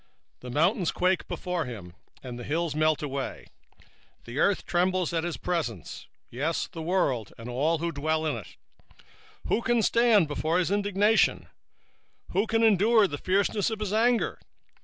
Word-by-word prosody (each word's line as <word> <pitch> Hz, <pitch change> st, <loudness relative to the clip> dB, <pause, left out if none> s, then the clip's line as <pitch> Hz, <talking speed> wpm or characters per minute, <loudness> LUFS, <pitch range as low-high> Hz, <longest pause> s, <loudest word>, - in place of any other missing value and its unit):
1:5 -, -, -50 dB
The 125 Hz, -, -9 dB
mountains 170 Hz, -, +1 dB
quake 180 Hz, 0 st, +1 dB
at 180 Hz, -5 st, -3 dB
him, 100 Hz, -8 st, -8 dB, 0.3 s
and 125 Hz, -2 st, -7 dB
the -, -, -6 dB
hills 165 Hz, +3 st, -1 dB
melt, 155 Hz, 0 st, +1 dB
and 140 Hz, -2 st, -4 dB, 0.8 s
the 120 Hz, +4 st, -5 dB
earth 200 Hz, +3 st, +3 dB
is -, -, -14 dB
burned 180 Hz, +1 st, +1 dB, 0.2 s
at 165 Hz, -1 st, 0 dB
his 175 Hz, -1 st, -3 dB
presence, 155 Hz, -, -4 dB, 0.2 s
yea, 140 Hz, +7 st, -1 dB, 0.2 s
the 165 Hz, -3 st, -7 dB
world, 145 Hz, -, 0 dB
and 115 Hz, -, -9 dB
all 145 Hz, +7 st, 0 dB
that 170 Hz, +1 st, -3 dB
dwell 155 Hz, +2 st, -1 dB
therein. 135 Hz, -9 st, -2 dB, 0.5 s
1:6 -, -, -25 dB, 0.4 s
Who 235 Hz, -, +2 dB
can 240 Hz, -2 st, +1 dB
stand 230 Hz, -7 st, +4 dB
before 155 Hz, +3 st, -1 dB
his 180 Hz, 0 st, 0 dB
indignation? 205 Hz, +2 st, +3 dB
and -, -, -18 dB, 0.8 s
who 200 Hz, +4 st, +1 dB
can 225 Hz, +1 st, +1 dB
abide 220 Hz, +1 st, +5 dB
in -, -, -4 dB
the 145 Hz, -, -3 dB
fierceness 200 Hz, +2 st, +1 dB
of 220 Hz, -1 st, -4 dB
his 210 Hz, -2 st, -3 dB
anger? 235 Hz, +2 st, +2 dB
170 Hz, 175 wpm, -27 LUFS, 145-205 Hz, 0.8 s, abide